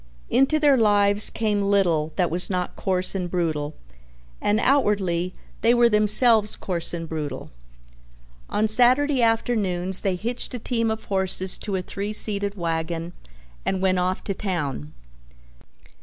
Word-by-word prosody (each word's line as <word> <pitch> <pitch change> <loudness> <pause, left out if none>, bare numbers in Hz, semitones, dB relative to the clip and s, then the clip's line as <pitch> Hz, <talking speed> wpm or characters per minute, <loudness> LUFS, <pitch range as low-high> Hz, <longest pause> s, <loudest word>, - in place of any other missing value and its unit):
Into 270 +5 +3
their 290 -3 +4
lives 205 -2 +3
came 210 -2 -1
little 180 -6 +1
that 180 -4 0
was 175 +2 0
not 180 -2 -3
coarse 185 -2 -1
and 180 -2 -3
brutal 155 -4 -2 0.7
and 210 +1 +1
outwardly 200 -10 +1 0.3
they 235 +2 +4
were 240 0 +4
themselves 215 0 +4
coarse 175 -3 -3
and 165 -1 -5
brutal. 150 -4 -6 1.0
On 215 +1 0
Saturday 255 +5 +3
afternoons 205 -6 +1
they 190 -2 -1
hitched 235 +6 -4
a - - -3
team 230 -1 -1
of 220 0 -4
horses 190 -1 0
to 205 -3 -4
a 185 - -2
three 200 +3 -5
seated 205 -1 +2
wagon 165 -1 -3 0.5
and 190 - -1
went 185 -1 +1
off 185 +1 -2
to 200 - -3
town. 150 - -4
200 Hz, 140 wpm, -23 LUFS, 175-220 Hz, 1.0 s, their